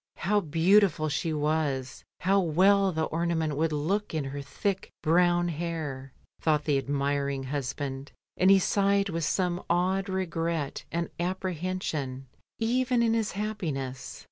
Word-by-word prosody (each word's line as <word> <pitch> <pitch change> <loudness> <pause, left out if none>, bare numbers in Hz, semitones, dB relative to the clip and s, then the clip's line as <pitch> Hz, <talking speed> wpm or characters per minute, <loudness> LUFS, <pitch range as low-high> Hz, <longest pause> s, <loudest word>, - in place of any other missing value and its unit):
How 205 +3 +1
beautiful 170 -1 +3
she 165 +3 -1
was, 150 -4 -1 0.2
how 195 +2 +3
well 190 +3 +4
the 160 -2 -1
ornament 160 -2 -1
would 160 +2 +1
look 165 +6 -1
in 155 - 0
her 140 +1 -5
thick 190 +7 -3
brown 175 +1 +3
hair, 155 -5 -4 0.3
thought 150 -2 +2
the 145 -3 +2
admiring 140 0 -1
husband, 135 0 -4 0.2
and 185 - +4
he 195 - +8
sighed 200 +1 +2
with 165 -2 -1
some 180 0 0
odd 185 +3 +1
regret 165 -5 -2
and 170 0 -2
apprehension 175 -7 -3 0.3
even 245 +1 +1
in 225 -1 +3
his 225 -2 0
happiness. 155 -12 -4
165 Hz, 135 wpm, -28 LUFS, 145-190 Hz, 0.3 s, he